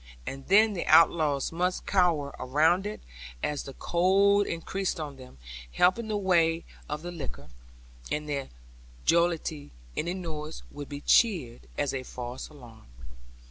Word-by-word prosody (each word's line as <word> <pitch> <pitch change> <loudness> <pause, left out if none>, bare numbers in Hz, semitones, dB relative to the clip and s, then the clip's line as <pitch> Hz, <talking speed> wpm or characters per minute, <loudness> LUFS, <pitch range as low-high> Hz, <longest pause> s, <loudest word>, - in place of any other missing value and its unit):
And 135 0 -7
then 215 +3 +5
the 180 - -4
outlaws 155 -5 +4
must 180 +2 -1
cower 170 -7 +2
round 160 +9 +2
it, 210 - -6 0.4
as 145 -1 -1
the 135 - -9
cold 195 +6 +3
increased 185 +2 -2
on 145 -3 -6
them, 130 - -13 0.4
helping 185 +6 +3
the 215 -1 -1
weight 170 -4 +2 0.2
of 150 +2 -4
the 175 - -5
liquor; 155 -6 -8 0.6
and 150 - -1
in - - -12
their 140 -2 -3 0.6
jollity 165 -3 +1 0.3
any 175 +3 -2
noise 160 -4 -6
would 145 -1 -8
be 145 0 -6
cheered 160 - +2
as 145 -2 0
a 135 - -2
false 125 0 -7
alarm. 120 - -15
165 Hz, 145 wpm, -28 LUFS, 145-180 Hz, 0.6 s, then